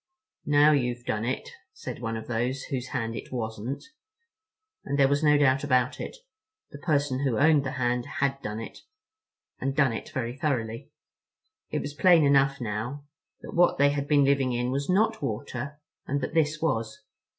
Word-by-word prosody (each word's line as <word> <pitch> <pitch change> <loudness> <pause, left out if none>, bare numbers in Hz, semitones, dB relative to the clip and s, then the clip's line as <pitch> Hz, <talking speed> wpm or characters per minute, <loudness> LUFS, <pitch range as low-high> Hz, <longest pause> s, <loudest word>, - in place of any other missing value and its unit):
"Now 145 +1 +6
you've 125 -4 0
done 110 +1 -1
it," 130 +2 -3 0.2
said - - -7
one 115 -1 -2
of 110 - -7
those 120 +3 -2
whose 130 -3 -4
hand 115 -2 -3
it - - -8
wasn't. 115 +1 -4 1.0
And 140 - -2
there 135 -1 +5
was 140 +2 +1
no 150 -1 +5
doubt 135 -1 +3
about 130 -1 +1
it; - - -6 0.5
the 145 - -9
person 145 -4 0
who 135 -5 0
owned 150 -1 +4
the 130 -1 -4
hand 125 -2 0
had 140 0 0
done 105 +1 -4
it—and 435 - -9
done 135 -5 +3
it 115 - -6
very 120 -1 -3
thoroughly. 125 -7 -2 0.8
It - - -2
was 145 - -5
plain 170 0 +5
enough 140 0 +3
now 120 +5 -4 0.4
that - - -9
what 175 +1 +4
they 140 +1 +4
had 145 0 -2
been 145 -1 +4
living 135 -2 +2
in 125 +1 -1
was 140 +3 -2
not 220 +4 +2
water, 140 +5 -4 0.3
and 140 +1 0
that 130 - -4
this 155 -2 +1
was. 115 -9 -2
135 Hz, 175 wpm, -27 LUFS, 120-145 Hz, 1.0 s, Now